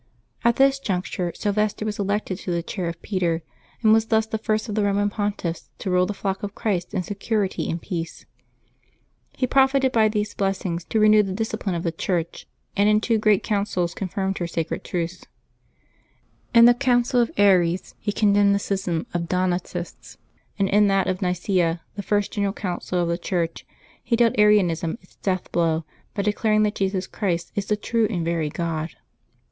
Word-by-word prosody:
At 235 0 +4
this 270 +1 +4
juncture 180 -5 -2
Syl 205 - -1
vester 210 +1 0
was 210 -1 -3
elected 200 -1 -1
to 185 - -4
the 170 -1 -1
chair 180 0 -4
of 170 0 -7
Peter, 170 -5 -1 0.4
and 215 -1 +6
was 225 0 +3
thus 220 -1 +2
the 220 0 -4
first 215 +1 -1
of 210 - -4
the 215 - +1
Eoman 205 0 +1
Pontiffs 200 -5 -3
to 190 - -3
rule 180 0 +3
the 210 - -4
flock 195 0 -3
of 205 0 -5
Christ 180 -5 -2
in 185 - 0
security 205 0 -2
and 165 - -2
peace. 165 -3 -5 1.1
He 255 - +1
profited 265 +1 +3
by 225 -3 +4
these 210 -1 -2
blessings 190 -3 -2
to 220 - 0
renew 215 0 +6
the 195 -2 -3
discipline 220 -2 -2
of 170 - -3
the 170 - 0
Church, 170 0 -3 0.3
and 205 +1 +4
in 210 0 +4
two 225 0 +1
great 210 -2 +3
Councils 200 -5 -1
confirmed 195 0 -3
her 175 - -2
sacred 165 -1 -3
truths. 175 0 -4 1.2
In 235 -1 +8
the 240 - +8
Council 245 -1 +2
of 235 - +1
Aries 185 -3 +3
he 205 - -2
condemned 205 -1 +3
the - - +1
schism 190 -5 -2
of 175 - 0
the 170 - -5
Donatists; 180 0 -3 0.4
and 200 -1 +2
in 205 +1 +4
that 195 -1 +2
of 185 +1 -2
Nicaea, 180 -2 0
the 200 - -4
first 205 +1 0
general 200 -2 0
Council 180 -2 -3
of 175 - +1
the 170 +1 -1
Church, 170 -2 -2 0.4
he 235 - +1
dealt 230 -1 +3
Arianism 185 -5 +3
its - - -24
death 185 -2 -2
blow 165 -2 +1 0.3
by 200 - -1
declaring 215 +1 +2
that 210 0 +1
Jesus 190 -2 -1
Christ 175 -5 -2
is 205 -1 -3
the 210 - +1
true 225 +1 +1
and 175 -7 -2
v 170 - 0
ery 160 -3 -1
God. 160 0 -3
200 Hz, 190 wpm, -23 LUFS, 175-215 Hz, 1.2 s, In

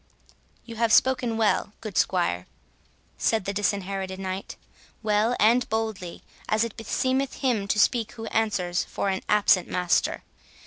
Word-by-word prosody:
"You 230 -2 -9
have 230 -1 +2
spoken 245 -2 +3
well, 215 -2 +1
good 215 -4 -7
squire," 90 - +1 0.7
said 220 -4 +1
the 200 - -2
Disinherited 195 -2 -2
Knight, 190 0 -5 0.5
"well 215 +3 +2
and 235 +4 +4
boldly, 220 -5 -3 0.3
as 215 +1 +2
it 230 -3 -4
beseemeth 260 +4 -1
him 235 -7 0
to 205 - 0
speak 225 0 +2
who 225 -1 -7
answers 200 -6 0
for 200 - -3
an 190 -1 -1
absent 205 -3 +4
master. 180 -1 0
210 Hz, 140 wpm, -25 LUFS, 190-225 Hz, 0.7 s, and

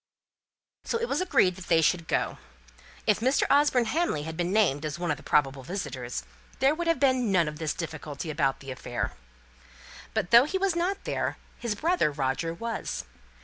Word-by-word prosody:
So - - -1
it 470 +1 -2
was - - 0
agreed 185 - +3
that 190 - -10
they 165 - +4
should 165 +1 +2
go. - - -1 0.7
If 210 - +3
Mr. 260 +5 +2
Osborne 280 -4 +4
Hamley 265 - 0
had 160 +1 -5
been 175 +1 -1
named 180 -9 +2
as 155 +1 -3
one 175 -2 -1
of 150 - -1
the - - -13
probable 135 -3 +1
visitors, 130 - -4 0.3
there 270 +2 +4
would 340 +2 -3
have 330 -5 +2
been 255 -5 +3
none 175 -4 +3
of 150 +1 -5
this 155 -2 -2
difficulty 155 -1 -5
about 135 -3 0
the 135 -1 -7
affair. 125 -1 -4 1.0
But 205 -5 -1
though 235 +3 +8
he 365 +6 -1
was 380 -2 +1
not 365 +3 -1
there, - - -2 0.2
his 235 -3 -2
brother 330 - +2
Roger 140 +3 -1
was. 230 +6 -4
180 Hz, 190 wpm, -28 LUFS, -, 1.0 s, though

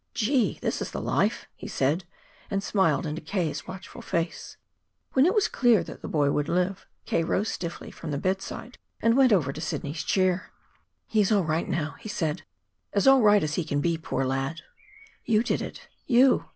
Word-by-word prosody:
"Gee, 235 -1 +1
this - - -1
is - - -3
the - - -5
life!" - - 0
he - - -8
said, 155 +7 0 0.4
and 195 -1 -1
smiled 170 -8 +2
into 155 +1 -4
K.'s 160 -4 -2
watchful 185 0 -9
face. 165 0 -3 0.6
When 265 +4 +5
it 375 - +2
was 420 - +3
clear 240 -5 +3
that - - -10
the - - -6
boy 145 -2 +2
would 145 +2 0
live, 180 +2 0 0.2
K. 165 - +1
rose 200 +6 0
stiffly 170 -1 -5
from - - -8
the 145 - -1
bedside 195 - -3 0.2
and 230 +1 +3
went 265 -2 +5
over 150 -9 +3
to 155 - -7
Sidney's 150 -1 -3
chair. 185 0 +1 0.5
"He's 210 -2 +2
all 205 -3 +4
right 160 +1 -1
now," 155 -3 -2
he 215 - -8
said 160 -4 -2 0.5
"as 200 - +2
all 270 -1 +7
right 210 -3 +5
as 150 -1 -1
he 175 - 0
can 145 -2 -1
be, 170 +3 +1
poor 160 -4 -2
lad!" 135 +5 -2 0.6
"You 220 -1 +2
did - - 0
it - - -8 0.2
you! 255 +1 +5
180 Hz, 190 wpm, -27 LUFS, 155-215 Hz, 0.6 s, all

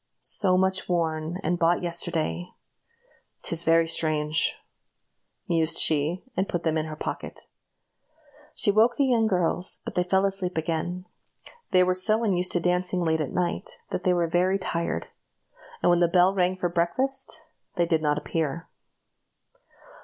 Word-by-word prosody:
So 185 -3 +3
much 190 0 0
worn, 165 -1 -1
and 175 +2 -1
bought 170 +2 +2
yesterday! 170 0 -1 1.0
'Tis 170 0 -1
very 165 0 +3
strange!" 155 -1 +1 0.9
mused 165 -2 +1
she, 155 +4 +2
and 190 +1 -1
put 175 -1 -3
them 160 -1 0
in 155 0 -1
her 155 - -6
pocket. - - -6 1.1
She 205 - +5
woke 225 +4 +3
the 280 - +2
young 235 -4 +2
girls, 180 -2 +2
but - - -5
they 180 - +1
fell 190 +2 +2
asleep 190 -3 -1
again. 170 +3 -3 0.6
They 185 0 +4
were 185 0 +2
so 215 +5 +2
unused 185 -4 0
to 175 - +2
dancing 180 +1 0
late 160 -1 +1
at 145 - -3
night, 175 -1 -3
that 185 - -3
they 180 -2 +2
were 175 -1 +1
very 180 +3 +1
tired; 170 -3 -3 0.8
and - - +5
when 175 - +3
the 175 - +4
bell 180 +2 +4
rang 185 -1 +1
for 185 -1 -1
breakfast, 265 - -2 0.3
they 175 -2 +2
did 160 -2 +1
not 150 -1 +1
appear. 160 +1 -3
175 Hz, 155 wpm, -26 LUFS, 165-185 Hz, 1.1 s, She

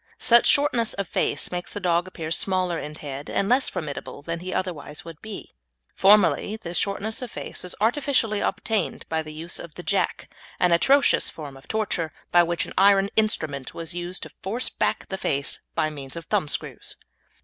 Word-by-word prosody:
Such 235 0 +5
shortness 280 -6 +3
of 200 -2 -3
face - - 0
makes 180 0 -4
the 205 - -4
dog 175 -1 +1
appear 160 -4 -6
smaller 185 -1 +1
in 150 0 -6
head 145 -2 -7
and 195 - 0
less 255 +4 +4
formidable 145 -2 -6
than 170 +2 -3
he 185 +2 -5
otherwise 155 -5 -4
would 165 -2 -10
be. 220 -2 -8 0.4
Formerly 205 +1 +4
this 175 -5 -6
shortness 210 +5 -1
of 250 - -5
face - - -4
was 180 - -2
artificially 230 -2 +2
obtained 215 +2 -1
by 160 0 0
the 155 -1 -8
use 160 +3 -4
of 170 - -9
the 180 - -7
"jack," 200 +1 0 0.3
an 180 - +4
atrocious 270 +12 +4
form 145 -4 -8
of 135 - -15
torture, 200 -7 -1 0.2
by 175 - +7
which 170 0 0
an - - -8
iron 195 0 +5
instrument 155 -11 0
was 165 -1 -4
used 175 +1 -3
to - - -9
force 225 +6 0
back - - -1
the 190 - -3
face 140 +1 0 0.2
by 155 - +1
means 135 -3 -8
of 165 -1 -7
thumbscrews. 150 - -1
180 Hz, 185 wpm, -25 LUFS, 160-210 Hz, 0.4 s, by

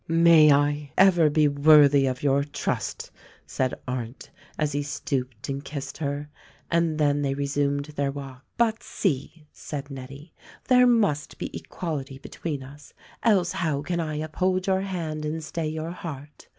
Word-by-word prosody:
"May 165 -2 +6
I 145 0 +1
ever 175 -5 +6
be 150 0 +3
worthy 145 -1 +6
of 130 +1 -3
your 140 0 +3
trust!" 145 0 -4 0.3
said 130 -1 -1
Arndt 125 -1 -5 0.3
as 150 -1 0
he 145 0 -1
stooped 130 -4 -4
and 140 0 -4
kissed 140 -1 -6
her. 145 -1 -3 0.4
And 165 -2 +1
then 145 -1 +2
they 135 -1 0
resumed 140 0 -1
their 145 -2 -2
walk. 135 -2 -9
"But 225 -1 +1
see 150 -2 -3
!" - - -46
said 145 -1 -7
Nettie. 140 +4 -10 0.4
"There 250 -1 +6
must 205 -12 +1
be - - -6
equality 140 -6 -5
between 140 0 -5
us, 145 +2 -14 0.3
else 195 -6 +3
how 155 -4 -1
can 175 +2 -2
I 155 -2 -2
uphold 185 +5 -1
your 190 -1 +1
hand 165 -6 -4
and 155 +1 -3
stay 160 +1 -3
your 160 +2 -4
heart. 150 -5 -9
150 Hz, 160 wpm, -25 LUFS, 140-165 Hz, 0.4 s, May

